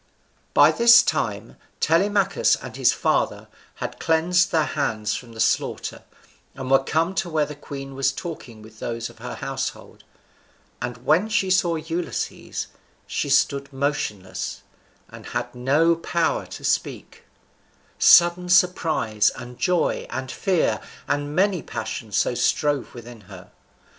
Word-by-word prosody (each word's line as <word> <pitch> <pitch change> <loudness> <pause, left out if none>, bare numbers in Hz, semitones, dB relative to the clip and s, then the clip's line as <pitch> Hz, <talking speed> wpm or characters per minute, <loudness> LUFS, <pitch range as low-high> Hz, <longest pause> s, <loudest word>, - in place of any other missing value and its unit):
By - - +7
this 235 0 +7
time - - -2 0.2
Telemachus 195 +3 +2
and - - -9
his - - +4
father - - 0 0.3
had - - -6
cleansed 175 +3 +2
their 160 -3 +2
hands 110 -7 -1
from 120 -2 -7
the 110 - -11
slaughter, - - -1 0.5
and 130 -1 -5
were 135 0 +5
come 165 +6 0
to 190 - -2
where 155 -2 +1
the 150 - -8
queen 135 -1 -8
was 135 0 +1
talking 135 -9 -8
with 110 0 -15
those 115 0 -4
of 115 - -21
her 125 +2 -6
household; 135 0 -5 0.8
and 120 0 -6
when 175 +8 +3
she 200 -4 +1
saw 175 -2 +2
Ulysses, 165 +2 -4 0.4
she - - -3
stood 140 0 +2
motionless, 135 -9 -3 0.4
and - - -12
had - - -5
no 145 +7 +2
power 165 0 -1
to - - -10
speak, - - -2 0.7
sudden 175 +1 +6
surprise 165 - +3
and 120 0 -10
joy 180 -2 0
and 130 0 -5
fear 185 -4 0 0.3
and 145 +1 -2
many 190 -2 +2
passions 110 -3 -5
so - - +2
strove 145 +2 0
within 120 -1 -11
her. 95 -2 -12
145 Hz, 140 wpm, -23 LUFS, 125-175 Hz, 0.8 s, By